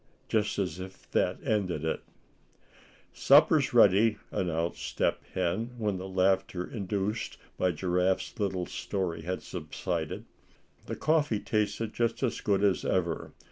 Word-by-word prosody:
just 105 -2 0
as 95 -4 -2
if 95 +1 -9
that - - +1
ended 90 -7 0
it." 80 - -1 1.1
"Supper's - - +5
ready," 105 +3 +5
announced 85 -2 -1
Step - - 0
Hen, 115 +8 -1
when 105 -4 -1
the 95 - -5
laughter 95 -1 +1
induced 100 +1 -3 0.2
by 90 - +1
Giraffe's 90 +4 0
little 95 -3 0
story 90 -4 -3
had 90 +3 -4
subsided. 85 0 -4 0.6
The - - -3
coffee 150 -8 +2
tasted 110 +1 -1
just 120 +3 0
as 125 - 0
good 100 -3 +1
as 100 -2 +3
ever. 85 -3 -1
95 Hz, 130 wpm, -29 LUFS, 90-105 Hz, 1.1 s, Supper's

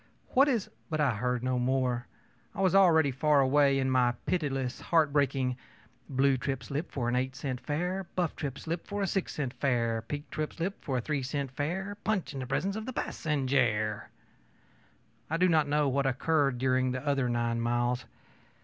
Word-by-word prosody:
What 270 +3 +5
is 240 -8 +1
ö - - -23 0.2
But 155 -1 -2
I 140 -5 +3
heard 125 +2 -1
no 130 -1 0
more. 125 -1 0 0.5
I - - -2
was 185 -1 +3
already 165 -7 +5
far 145 +3 +3
away 140 +1 +4
with 135 - +1
my 125 -2 +3
pitiless, 135 -7 -1
heartbreaking 140 -5 +2 0.5
ōblue 135 0 +3
trip 135 -1 -3
slip 145 +7 -4
for 125 -4 -2
an 120 - +1
eight 130 +1 -1
cent 130 -3 -4
fare, 180 +5 -2
buff 175 -4 0
trip 140 -4 -4
slip 165 +1 -4
for 205 0 -2
a - - +2
six 195 0 -2
cent 135 -4 -2
fare, 115 -5 0
pink 145 +5 -6
trip 155 -1 -3
slip 185 +4 -4
for 135 -4 -1
a - - 0
three 150 +1 -2
cent 135 0 -3
fare; 190 +9 -3
punch 205 -7 -1
in 135 - -5
the 130 - -5
presence 190 +10 -1
of 220 +2 -5
the 260 - -4
passenjare.ö 125 - 0 1.2
I 165 - 0
do 180 +2 +4
not 155 -4 +3
know 150 0 +2
what 135 0 +1
occurred 140 0 +1
during 130 0 +2
the 130 +3 -4
other 140 -3 +1
nine 120 -1 0
miles. 120 +1 0
140 Hz, 190 wpm, -30 LUFS, 125-160 Hz, 1.2 s, What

